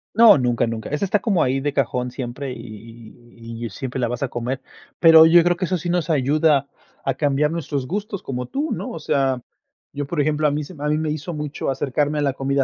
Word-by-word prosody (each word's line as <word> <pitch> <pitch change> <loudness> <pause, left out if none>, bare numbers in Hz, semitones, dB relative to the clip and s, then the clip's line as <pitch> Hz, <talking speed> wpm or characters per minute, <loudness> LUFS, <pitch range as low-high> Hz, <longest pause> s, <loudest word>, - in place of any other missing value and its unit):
No, 225 -4 +8
nunca, 120 -2 +1
nunca. 115 -1 -5
Esa 150 +7 -1
está, 205 +2 +1
como 190 -4 +1
ahí 130 +1 +1
de 145 +1 -2
cajón, 125 -2 -1
siempre, 130 +2 -5
y - - -9
y 115 +1 -13 0.3
y - - -2
y - - -4
siempre 130 +5 -5
la 120 - +1
vas 120 +2 -3
a 135 - -1
comer. 125 +3 -3 0.4
Pero 160 -1 +8
yo 170 +1 +6
creo, 175 +1 +2
que 185 - -1
eso 185 +1 -1
sí 175 +1 -5
nos 175 -2 0
ayuda, 145 0 +2 0.4
a - - +1
cambiar 145 0 +1
nuestros 145 -5 -3
gustos, 200 +2 -4
como 125 -2 -4
tú, 290 - -2
¿no? - - -5
O - - -6
sea, 135 -2 0 0.5
yo 145 +1 -3
por 165 +1 -3
ejemplo, 155 +1 +1
a - - +1
mí 150 +1 -2
se 165 - -10
a 145 +1 -3
mí, 150 - +2
me 155 -1 -1
hizo 155 +3 -5
mucho 150 -2 -4
acercarme, 145 +2 -1
a - - 0
la 140 -2 +1
comida 135 +1 0
145 Hz, 240 wpm, -21 LUFS, 130-160 Hz, 0.5 s, No